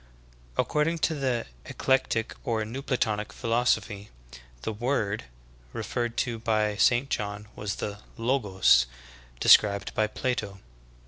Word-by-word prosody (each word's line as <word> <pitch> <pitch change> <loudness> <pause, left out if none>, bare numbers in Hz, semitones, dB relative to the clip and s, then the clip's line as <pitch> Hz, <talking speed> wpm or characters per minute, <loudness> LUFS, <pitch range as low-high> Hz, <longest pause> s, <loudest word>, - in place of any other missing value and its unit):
"'' - - -27
According 155 +3 +1
to 160 - 0
the 130 -5 -1 0.2
Eclectic 130 -4 0
or 110 -2 -1
New 125 +5 -5
Platonic 110 -6 -1
philosophy, 110 -3 0 0.5
the 110 - -2
"Word" 110 - -1 0.5
referred 120 -1 -3
to 120 -3 -4
by 110 -2 +1
St. 120 +5 +3
John 105 -4 -3
was 100 -1 -3
the 105 -1 -5 0.2
"Logos" 100 - +3 0.5
described 100 -1 +5
by 110 - +2
Plato. 110 -4 -3
110 Hz, 120 wpm, -27 LUFS, 105-125 Hz, 0.5 s, described